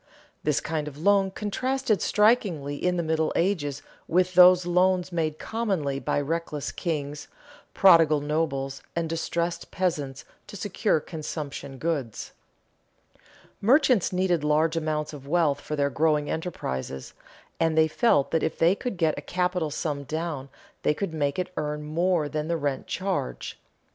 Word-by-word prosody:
This 150 Hz, -2 st, +2 dB
kind 155 Hz, -2 st, -3 dB
of 145 Hz, -1 st, -8 dB
loan 195 Hz, +4 st, +3 dB
contrasted 225 Hz, +4 st, -1 dB
strikingly 200 Hz, -, +2 dB
in 180 Hz, +4 st, 0 dB
the 170 Hz, -, 0 dB
Middle 160 Hz, 0 st, 0 dB
Ages 145 Hz, -7 st, 0 dB, 0.2 s
with 180 Hz, +2 st, +2 dB
those 180 Hz, 0 st, +7 dB
loans 180 Hz, +1 st, +2 dB
made 160 Hz, -3 st, -1 dB
commonly 190 Hz, -13 st, -2 dB
by -, -, 0 dB
reckless 150 Hz, 0 st, -3 dB
kings, 145 Hz, -3 st, -4 dB, 0.5 s
prodigal 165 Hz, -5 st, +6 dB
nobles, 145 Hz, -3 st, -2 dB
and 170 Hz, -1 st, -1 dB
distressed 170 Hz, +1 st, -2 dB
peasants 150 Hz, -7 st, -2 dB, 0.2 s
to -, -, -10 dB
secure 205 Hz, -2 st, 0 dB
consumption 150 Hz, -4 st, -6 dB
goods. 140 Hz, -8 st, -3 dB, 1.3 s
Merchants 250 Hz, -, +4 dB
needed 180 Hz, -4 st, +1 dB
large 155 Hz, +2 st, +2 dB
amounts 155 Hz, -1 st, -2 dB
of 140 Hz, -2 st, -10 dB
wealth 150 Hz, -3 st, +2 dB
for 150 Hz, -, -4 dB
their 140 Hz, -1 st, +1 dB
growing 150 Hz, 0 st, +1 dB
enterprises, 65 Hz, -, -4 dB, 0.5 s
and 160 Hz, -1 st, +1 dB
they 160 Hz, 0 st, +6 dB
felt 155 Hz, -, +2 dB
that 160 Hz, -, +2 dB
if 160 Hz, -, -1 dB
they 170 Hz, +3 st, +4 dB
could 205 Hz, -1 st, -4 dB
get 160 Hz, -2 st, +1 dB
a -, -, -8 dB
capital 180 Hz, -3 st, -1 dB
sum 145 Hz, -1 st, -3 dB
down 155 Hz, -2 st, -4 dB, 0.3 s
they 150 Hz, -, +2 dB
could 195 Hz, -2 st, -3 dB
make 145 Hz, -3 st, -1 dB
it 185 Hz, 0 st, -3 dB
earn 150 Hz, 0 st, -2 dB
more 165 Hz, +1 st, +1 dB
than 150 Hz, +1 st, -3 dB
the 170 Hz, 0 st, 0 dB
rent 140 Hz, -3 st, -2 dB
charge. 185 Hz, -, -3 dB
160 Hz, 150 wpm, -26 LUFS, 145-180 Hz, 1.3 s, those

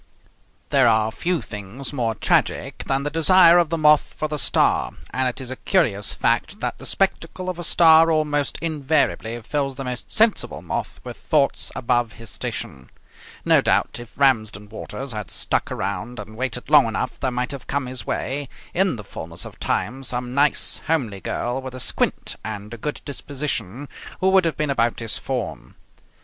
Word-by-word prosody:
There 135 Hz, -3 st, +5 dB
are 110 Hz, -1 st, +3 dB
few 175 Hz, +7 st, -1 dB
things 105 Hz, +7 st, -6 dB
more 115 Hz, -5 st, -1 dB
tragic -, -, 0 dB
than 135 Hz, 0 st, 0 dB
the 145 Hz, -, -2 dB
desire 170 Hz, +1 st, +6 dB
of 170 Hz, -3 st, +2 dB
the 165 Hz, -, -1 dB
moth 150 Hz, -1 st, +4 dB
for 155 Hz, -, -1 dB
the 150 Hz, -1 st, -3 dB
star; -, -, +2 dB, 0.2 s
and 130 Hz, 0 st, 0 dB
it 125 Hz, -, -6 dB
is 130 Hz, -1 st, -6 dB
a -, -, -3 dB
curious 115 Hz, -, +1 dB
fact -, -, 0 dB
that -, -, -3 dB
the -, -, -5 dB
spectacle 185 Hz, 0 st, 0 dB
of 175 Hz, -, -10 dB
a -, -, -4 dB
star 165 Hz, -1 st, +6 dB
almost 150 Hz, -3 st, 0 dB
invariably 145 Hz, -7 st, 0 dB
fills 135 Hz, +2 st, -2 dB
the 135 Hz, -, -5 dB
most 125 Hz, -1 st, -5 dB
sensible 220 Hz, 0 st, +2 dB
moth -, -, -4 dB
with -, -, -8 dB
thoughts -, -, +1 dB
above 120 Hz, -1 st, 0 dB
his 115 Hz, -1 st, -5 dB
station. 65 Hz, -1 st, -4 dB, 0.6 s
No -, -, +5 dB
doubt, -, -, +1 dB
if 120 Hz, -1 st, -12 dB
Ramsden 110 Hz, -7 st, +2 dB
Waters 115 Hz, +4 st, -6 dB
had 105 Hz, -3 st, -5 dB
stuck -, -, -1 dB
around 105 Hz, +5 st, -4 dB
and 110 Hz, +1 st, -9 dB
waited 125 Hz, 0 st, -3 dB
long 145 Hz, -6 st, +7 dB
enough 115 Hz, +3 st, -3 dB
there 130 Hz, -, 0 dB
might 125 Hz, +1 st, -2 dB
have 140 Hz, -2 st, -8 dB
come 140 Hz, -1 st, -1 dB
his 125 Hz, -3 st, -5 dB
way 135 Hz, +5 st, -3 dB, 0.2 s
in 190 Hz, -2 st, +2 dB
the 105 Hz, -, -8 dB
fullness 85 Hz, -2 st, -6 dB
of -, -, -11 dB
time 120 Hz, +8 st, -1 dB
some 125 Hz, -1 st, -1 dB
nice, 145 Hz, +2 st, +2 dB
homely 125 Hz, -12 st, 0 dB
girl 120 Hz, +2 st, -2 dB
with 130 Hz, -1 st, -7 dB
a -, -, -7 dB
squint -, -, +1 dB
and 105 Hz, +1 st, -6 dB
a -, -, -6 dB
good 150 Hz, +6 st, -4 dB
disposition 140 Hz, -4 st, -4 dB, 0.3 s
who 190 Hz, -, +3 dB
would 190 Hz, -2 st, +5 dB
have 160 Hz, -5 st, -1 dB
been 150 Hz, -2 st, 0 dB
about 120 Hz, -3 st, +1 dB
his 115 Hz, -2 st, -1 dB
form. 130 Hz, -3 st, -5 dB
130 Hz, 185 wpm, -22 LUFS, 115-150 Hz, 0.6 s, long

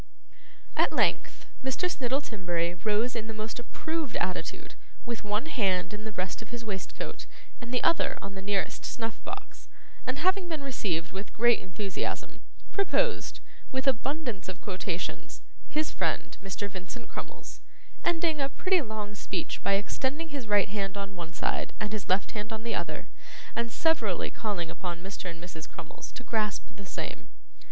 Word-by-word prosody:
At -, -, +5 dB
length -, -, +3 dB, 0.2 s
Mr. 265 Hz, +7 st, +2 dB
Snittle 270 Hz, -4 st, +1 dB
Timberry 175 Hz, -5 st, +1 dB
rose 215 Hz, +6 st, +2 dB
in 220 Hz, -1 st, -1 dB
the 225 Hz, -, -4 dB
most 215 Hz, +2 st, -3 dB
approved 315 Hz, +3 st, -2 dB
attitude, 180 Hz, 0 st, -1 dB, 0.3 s
with 235 Hz, -2 st, -2 dB
one 210 Hz, +4 st, +1 dB
hand 195 Hz, -, +2 dB
in 210 Hz, +1 st, -5 dB
the 220 Hz, -, -2 dB
breast 185 Hz, 0 st, -1 dB
of 225 Hz, -, -9 dB
his 240 Hz, -1 st, -4 dB
waistcoat 195 Hz, -3 st, -3 dB, 0.3 s
and 240 Hz, 0 st, -5 dB
the 250 Hz, -, +2 dB
other 335 Hz, -, +4 dB
on 200 Hz, 0 st, -5 dB
the 190 Hz, -, -5 dB
nearest 200 Hz, 0 st, +1 dB
snuff 225 Hz, -2 st, -2 dB
box, -, -, -6 dB, 0.4 s
and 255 Hz, +2 st, +1 dB
having 370 Hz, +3 st, +3 dB
been 310 Hz, -4 st, -1 dB
received 190 Hz, -11 st, 0 dB
with 195 Hz, +2 st, -5 dB
great 240 Hz, +1 st, +6 dB
enthusiasm, 190 Hz, +1 st, -2 dB, 0.3 s
proposed, 440 Hz, +4 st, +2 dB, 0.3 s
with 265 Hz, +1 st, 0 dB
abundance 260 Hz, -5 st, +1 dB
of 185 Hz, +2 st, -4 dB
quotations, 190 Hz, -4 st, -2 dB, 0.3 s
his 305 Hz, +1 st, +2 dB
friend -, -, +1 dB
Mr. 195 Hz, +1 st, -2 dB
Vincent 190 Hz, +4 st, -6 dB
Crummles: -, -, -7 dB, 0.4 s
ending 330 Hz, -3 st, +3 dB
a 275 Hz, -, +2 dB
pretty 370 Hz, +4 st, +4 dB
long 215 Hz, -4 st, -3 dB
speech 205 Hz, -, -2 dB
by 200 Hz, -, +4 dB
extending 265 Hz, +10 st, +1 dB
his 280 Hz, -6 st, -3 dB
right 205 Hz, -1 st, +5 dB
hand 195 Hz, -1 st, -1 dB
on 200 Hz, 0 st, -3 dB
one 170 Hz, -2 st, -5 dB
side -, -, 0 dB
and 210 Hz, 0 st, -1 dB
his 205 Hz, -3 st, -2 dB
left 190 Hz, +4 st, +3 dB
on 220 Hz, +1 st, -2 dB
the 235 Hz, -, 0 dB
other, -, -, -1 dB, 0.5 s
and 235 Hz, 0 st, +1 dB
severally 225 Hz, -, +3 dB
calling 200 Hz, -7 st, -1 dB
upon 175 Hz, -2 st, -3 dB
Mr. 190 Hz, -1 st, -4 dB
and 165 Hz, -1 st, -6 dB
Mrs. 165 Hz, -2 st, -7 dB
Crummles -, -, -7 dB
to 250 Hz, -, -6 dB
grasp 210 Hz, -2 st, 0 dB
the 200 Hz, -1 st, -8 dB
same. -, -, -4 dB
215 Hz, 165 wpm, -31 LUFS, 195-260 Hz, 0.5 s, great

